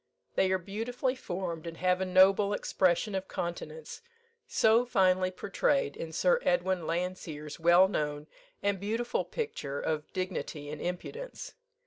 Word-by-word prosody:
They 190 - +2
are 190 - +3
beautifully 225 +8 -2
formed, 175 -7 -4
and 165 0 -6
have 180 +1 +2
a - - +1
noble 190 +2 +5
expression 190 +1 +1
of 190 0 -2
countenance, 160 -3 -5 0.5
so 225 - +4
finely 185 -6 +3
portrayed 195 - 0
in 165 - -6
Sir 485 - +3
Edwin 190 - +1
Landseer's 165 -4 -4
well 175 +3 +6
known 150 -5 -2 0.4
and 200 -1 +1
beautiful 225 +5 -1
picture 145 - -4
of 155 -1 -2
"Dignity 175 -5 -4
and 150 - -6
Impudence." 455 - -5
185 Hz, 135 wpm, -30 LUFS, 165-205 Hz, 0.5 s, well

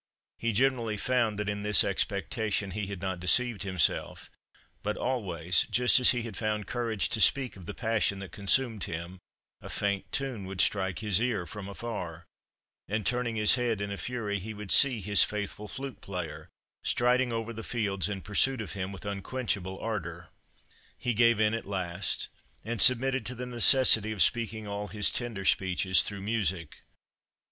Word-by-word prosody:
He 115 - 0
generally 115 -2 +1
found 115 -2 0
that 105 0 -3
in 105 0 -2
this 105 0 +4
expectation 100 +1 -1
he 105 +1 -4
had 100 -1 -7
not 95 -2 -3
deceived 110 +4 +3
himself; 95 -5 -1 0.5
but, 105 +1 -3
always, 90 -9 0
just 125 +1 +4
as 125 - +6
he 120 -2 +2
had 115 -4 -7
found 105 -1 -2
courage 115 -2 -1
to 110 - +1
speak 135 +1 +4
of 90 -3 -12
the - - -6
passion 110 -3 0
that 95 -3 -8
consumed 105 +1 +1
him, 85 +3 -6 0.4
a - - -9
faint 100 -2 -2
tune 130 -8 -3
would 95 -1 -7
strike 95 -2 +1
his 105 0 +4
ear 115 -7 -1
from 100 +1 -8
afar, 90 -7 -6 0.6
and, 110 +1 -2
turning 120 -2 -1
his 105 -1 +5
head 120 -4 0
in 100 0 -4
a - - -3
fury, 110 -5 -3
he 110 +4 -7
would 105 -2 -6
see 130 -6 +5
his 105 +1 +5
faithful 105 0 -4
flute 135 +4 -7
player 90 -5 -6 0.3
striding 125 +1 +2
over 115 0 -3
the 115 - -7
fields 105 -4 -1
in 100 -2 -4
pursuit 130 +5 +1
of 110 - -6
him 95 -1 -4
with 95 +1 -10
unquenchable 100 -2 -3
ardour. 85 -6 -5 0.7
He 120 - -1
gave 115 0 +4
in 105 0 +3
at 115 - -4
last, 90 -3 -2 0.4
and 115 -2 -2
submitted 135 0 +4
to 125 - -6
the 125 +1 -5
necessity 120 -2 +5
of 105 -4 +3
speaking 115 -2 -1
all 100 0 -4
his 105 0 +1
tender 115 -6 -4
speeches 95 0 +3
"through 100 -2 -5
music." 95 -7 -2
105 Hz, 175 wpm, -29 LUFS, 95-120 Hz, 0.7 s, as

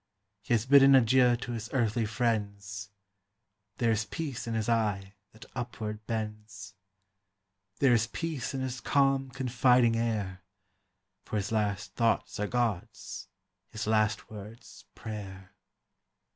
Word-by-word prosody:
He 120 - +1
has 110 0 0
bidden 135 0 +7
adieu 125 0 +5
to 120 +1 -6
his 115 -2 -5
earthly 115 -3 +1
friends; 105 -3 -2 0.9
There 115 -2 +2
is 110 0 0
peace 135 -7 -5
in 115 - -2
his 110 -1 -1
eye 105 -4 0 0.2
that 110 - -14
upward 110 -4 -5
bends; 105 -3 -5 1.0
There 135 -3 +4
is 115 -1 +3
peace 145 -2 -4
in 135 - -2
his 130 -1 -4
calm, 135 -1 +2
confiding 125 -2 +3
air; 105 -5 -2 0.8
For - - -6
his 100 0 -1
last 105 -2 -1
thoughts 115 -3 0
are 105 - 0
God's, 115 -6 -3 0.4
his 110 - -5
last 110 0 +1
words 110 +3 -11
prayer. 95 -4 -8
115 Hz, 130 wpm, -29 LUFS, 105-125 Hz, 1.0 s, bidden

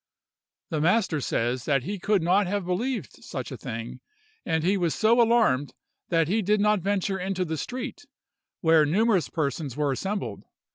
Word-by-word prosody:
The 155 -2 0
master 180 -3 +2
says 120 0 -1
that 140 -3 +1
he 200 +6 -4
could 200 -1 +1
not 185 +3 +3
have 200 0 -2
believed 185 - -3
such - - -6
a - - -4
thing; 115 +1 -6 0.4
and 160 -1 0
he 190 +4 +3
was 175 -4 0
so 230 +2 +4
alarmed 225 - +2 0.3
that 165 -3 +2
he 215 +6 +1
did 210 +2 +2
not 210 0 +3
venture 195 0 -1
into 185 0 -2
the 160 -1 -3
street, 255 - -6 0.5
where 160 -2 +5
numerous 190 +4 +2
persons 145 -3 -3
were 145 -2 +1
assembled. 135 - -4
180 Hz, 170 wpm, -26 LUFS, 155-210 Hz, 0.5 s, where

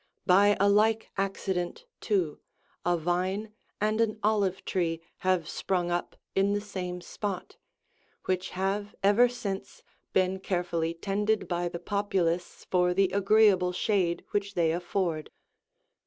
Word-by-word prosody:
By 200 +2 +5
a 200 - +4
like 215 +2 +3
accident, 195 - -2
too, 185 -8 0 0.4
a 175 0 +2
vine 185 +6 -1 0.3
and 215 +2 +1
an 220 -1 +1
olive 205 -3 +1
tree 165 -3 0 0.2
have 185 -3 +1
sprung 175 0 -1
up 175 0 -2 0.2
in 195 +1 +2
the 205 - +1
same 185 -3 -5
spot,76 195 +1 -5 0.7
which 185 0 -1
have 195 +2 -2
ever 215 +5 +5
since 205 -6 -5 0.3
been 190 0 +2
carefully 175 -3 -1
tended 205 +4 0
by 175 -1 -1
the 170 - -5
populace 180 -3 -1
for 180 -1 +3
the 195 -1 +3
agreeable 200 -2 +4
shade 180 -3 0
which 200 -1 -1
they 165 -2 +3
afford. 175 -2 -2
190 Hz, 130 wpm, -28 LUFS, 175-205 Hz, 0.7 s, By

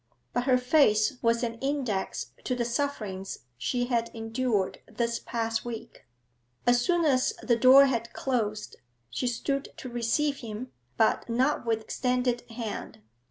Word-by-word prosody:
But 245 0 0
her 255 -2 +5
face 250 -3 +3
was 230 +1 +2
an 230 -1 -3
index 265 -8 -2
to 255 - 0
the 240 -1 -1
sufferings 225 -7 -3
she 245 - -1
had 235 -2 0
endured 225 -3 -1
this 235 -1 -1
past 225 -1 -2
week. 230 -1 -8 0.6
As 245 0 +4
soon 345 +5 +2
as 260 -4 +3
the 240 - +3
door 260 +4 +8
had 235 -3 -1
closed, 215 -6 -2 0.3
she 250 - -1
stood 275 +4 -1
to 255 - -7
receive 245 +5 0
him, 230 +1 -7 0.3
but 220 +2 +2
not 250 +2 +1
with 225 -1 +1
extended 250 +1 -1
hand. 225 - -6
240 Hz, 145 wpm, -28 LUFS, 225-255 Hz, 0.6 s, door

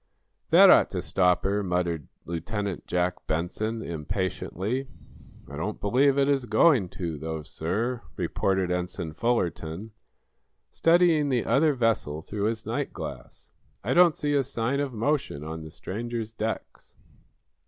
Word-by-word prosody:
"That - - +8
ought - - +6
to - - -3
stop 90 -1 +2
her!" 100 +2 +1
muttered 90 -5 -1 0.2
Lieutenant 95 +4 -4
Jack 90 0 -1
Benson, 110 +8 -2
impatiently. 95 - -3 0.6
"I 70 - -9
don't 105 +7 -3
believe 135 +7 +3
it 140 0 +3
is 135 -3 +1
going 110 - +4
to, 85 -5 -3
though, 80 0 -4
sir," 115 - -2
reported 95 +1 0
Ensign 90 -2 -3
Fullerton, 95 -2 -1 0.8
studying 165 -3 +4
the 125 -4 +1
other 150 +2 +3
vessel 110 - 0
through 100 +1 -3
his 110 0 -2
night - - -2
glass. - - -8 0.3
"I - - 0
don't 175 -2 +5
see 145 0 0
a 140 - +4
sign 130 +1 -1
of 140 -2 -1
motion 120 - -1
on 80 +1 -6
the 80 - -8
stranger's 115 +6 -5
decks." 110 0 -5
105 Hz, 140 wpm, -27 LUFS, 85-125 Hz, 0.8 s, That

